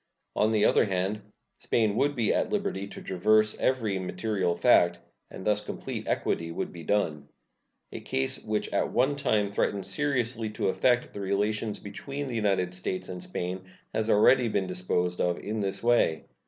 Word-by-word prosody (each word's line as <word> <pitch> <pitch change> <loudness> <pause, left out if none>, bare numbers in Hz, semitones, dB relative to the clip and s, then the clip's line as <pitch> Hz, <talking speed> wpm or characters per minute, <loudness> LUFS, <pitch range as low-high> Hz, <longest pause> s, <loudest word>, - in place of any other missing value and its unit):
On 105 - +3
the 110 -1 +3
other - - +4
hand, 95 +2 -1 0.4
Spain 110 -3 +1
would 145 +4 +1
be 115 -4 +1
at - - 0
liberty 200 - -2
to - - -10
traverse 110 +4 +3
every 110 -7 +1
material 95 -1 -1
fact, 85 -8 +4 0.3
and 95 - -9
thus 105 0 +2
complete 105 - -6
equity 85 0 -1
would - - -4
be 85 - -9
done. 80 -6 -1 0.6
A - - -6
case 65 0 -2
which 105 -1 -1
at - - 0
one 135 +3 +2
time 105 -7 +1
threatened 100 -1 -1
seriously 120 -6 -1
to 105 - 0
affect 120 +5 +1
the - - -6
relations 105 +2 -1
between 140 +8 -6
the 130 -3 -4
United 95 -5 +1
States 95 0 -4
and 90 -1 -6
Spain 90 +1 -3 0.3
has 110 0 -1
already 120 +4 +5
been 100 -3 0
disposed 90 -1 -1
of 90 -1 +1
in 110 +1 -4
this 100 0 -3
way. 120 -9 +2
105 Hz, 170 wpm, -28 LUFS, 95-115 Hz, 0.6 s, already